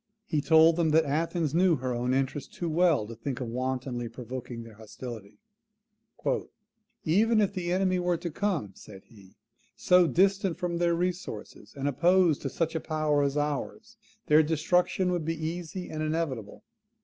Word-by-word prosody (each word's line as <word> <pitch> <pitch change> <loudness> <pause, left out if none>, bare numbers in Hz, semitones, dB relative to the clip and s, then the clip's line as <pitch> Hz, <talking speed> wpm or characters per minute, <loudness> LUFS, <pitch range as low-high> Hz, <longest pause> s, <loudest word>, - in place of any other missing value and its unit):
He 155 -3 0
told 160 +1 +5
them 165 -2 +2
that 160 +1 +4
Athens 155 +1 -1
knew 175 0 +4
her 130 -2 -3
own 120 +1 -1
interest 135 +1 -2
too 170 - -3
well 165 -8 +3
to 115 - -8
think 125 +3 -5
of 125 - -4
wantonly 125 -1 -3
provoking 125 -1 -7
their 115 -1 -12
hostility: 110 -1 -9 1.7
"EVEN 215 +7 +3
IF 205 -2 +1
THE 175 -2 -3
ENEMIES 185 0 +1
WERE 175 -1 +1
TO 170 0 -5
COME," 170 - -1
said 95 0 -13
he, 100 -5 -18 0.4
"SO 180 -1 +4
DISTANT 195 0 +2
FROM 175 -2 -2
THEIR 170 -1 +2
RESOURCES, 170 - -5
AND 140 0 -2
OPPOSED 170 +3 +3
TO 135 - -3
SUCH 165 +4 -2
A 160 - -1
POWER 155 -2 0
AS 140 0 0
OURS, 150 +10 -3 0.3
THEIR 150 +1 +6
DESTRUCTION 175 +4 +1
WOULD 175 -3 -1
BE 160 -1 -3
EASY 175 +2 -5
AND 155 - -4
INEVITABLE. 155 -9 -3
155 Hz, 165 wpm, -28 LUFS, 130-175 Hz, 1.7 s, THEIR